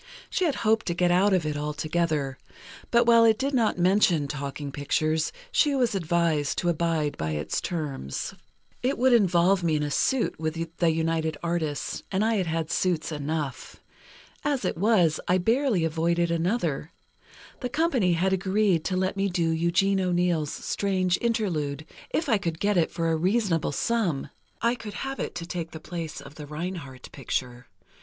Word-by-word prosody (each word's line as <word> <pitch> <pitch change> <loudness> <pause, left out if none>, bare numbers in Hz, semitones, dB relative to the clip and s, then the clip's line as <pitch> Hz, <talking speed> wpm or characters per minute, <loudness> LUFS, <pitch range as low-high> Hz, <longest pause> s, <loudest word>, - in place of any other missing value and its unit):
She 370 - +1
had 305 - +1
hoped 220 +1 +2
to 170 - 0
get 175 0 +2
out 190 +3 +4
of 185 -4 +2
it 150 -1 -1
altogether; 150 -2 -1 0.5
but 235 0 +4
while 230 -1 +6
it 220 -1 +5
did 275 +3 -1
not 230 -7 +2
mention 180 -4 +3
talking 140 0 -5
pictures, 155 +3 0 0.2
she 305 - +3
was 245 -5 +2
advised 170 -5 +1
to 175 - +1
abide 165 -3 0
by 80 0 -2
the 75 - -3
terms. 145 - -3 0.5
"It 260 +3 0
would 255 +1 +4
involve 185 -3 +4
me 165 -2 +1
in 150 - 0
a 145 - -2
suit 260 - +1
with 160 0 -2 0.2
the 170 - +3
United 160 -1 0
Artists, 165 -4 -2
and 195 +2 +1
I 225 -1 +2
had 185 -3 0
had 160 0 -2
suits 175 -3 0
enough. 150 -2 -4 0.6
As 285 -3 0
it - - 0
was, 180 -4 +3
I 180 - +4
barely 225 - +2
avoided 170 +1 +1
another: 170 - -1 0.7
The 250 - -3
company 265 - +2
had 190 +3 +1
agreed 190 -2 +2
to 185 - 0
let 185 +1 0
me 195 0 0
do 170 -3 0
Eugene 175 +4 +2
O'Neill's 175 -4 +1
'Strange 185 -3 0
Interlude,' 165 -11 -1 0.2
if 325 - -1
I 220 - +3
could 165 -4 -3
get 205 0 +1
it 170 -3 +3
for 165 -1 -1
a - - +2
reasonable 185 -1 +1
sum—I 220 - -1
could 225 -4 -7
have 270 0 -4
it - - -4
to 170 - -4
take 170 -2 -4
the 160 - -9
place 165 -1 -6
of - - -11
the 150 -1 -9
Reinhardt 150 -4 -6
picture. 125 -2 -4
170 Hz, 175 wpm, -26 LUFS, 155-205 Hz, 0.7 s, while